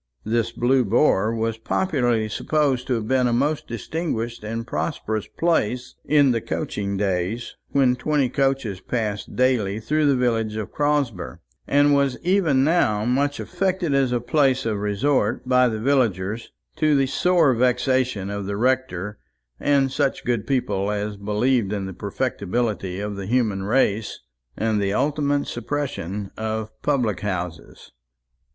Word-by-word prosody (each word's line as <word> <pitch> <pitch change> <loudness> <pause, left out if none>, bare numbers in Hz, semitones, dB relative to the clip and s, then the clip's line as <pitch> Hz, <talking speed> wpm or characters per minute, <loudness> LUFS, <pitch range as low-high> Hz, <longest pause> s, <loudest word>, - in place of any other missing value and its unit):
This 115 +1 0
Blue 125 +2 +2
Boar 110 -1 +3
was 115 0 -2
popularly 120 - 0
supposed 135 +2 0
to 125 - +1
have 110 -2 -3
been 130 0 +2
a - - +1
most 145 +5 0
distinguished 120 - -3
and 115 +2 -4
prosperous 110 -3 -3
place 125 -7 0
in 145 -3 +4
the 115 -2 0
coaching 100 -1 -3
days, 95 +4 -2
when 130 -3 +3
twenty 145 +1 +1
coaches 135 -7 -1
passed 105 -2 -3
daily 115 -6 +1
through 150 +6 +1
the 140 - +4
village 115 -4 0
of 110 -2 -4
Crosber; 135 - -1 0.3
and 145 +1 +4
was 140 -2 +2
even 170 -8 +3
now 125 -10 +2
much 140 +4 +1
affected 180 -3 -1
as 135 -2 +2
a 120 - +1
place 130 +1 +2
of 110 -3 -1
resort 110 +7 0
by 125 0 +4
the 110 -2 -2
villagers, 110 -5 0 0.3
to 155 -1 +3
the 135 -1 +3
sore 165 +1 +3
vexation 125 -4 +1
of 100 -1 -4
the 100 0 -3
rector 110 -5 -1 0.4
and 140 -2 +2
such 140 0 -1
good 120 -4 -1
people 105 -7 0
as 105 0 -2
believed 105 +2 0
in 100 -2 -2
the 95 - -6
perfectibility 100 -1 -2
of 105 0 -4
the 100 -1 -5
human 110 -4 +1
race 105 0 0 0.4
and 110 -2 +1
the 100 0 0
ultimate 145 +2 +1
suppression 110 - -4
of 110 0 -3
public 125 -10 0
houses. 90 -3 -5
120 Hz, 145 wpm, -23 LUFS, 105-140 Hz, 0.4 s, in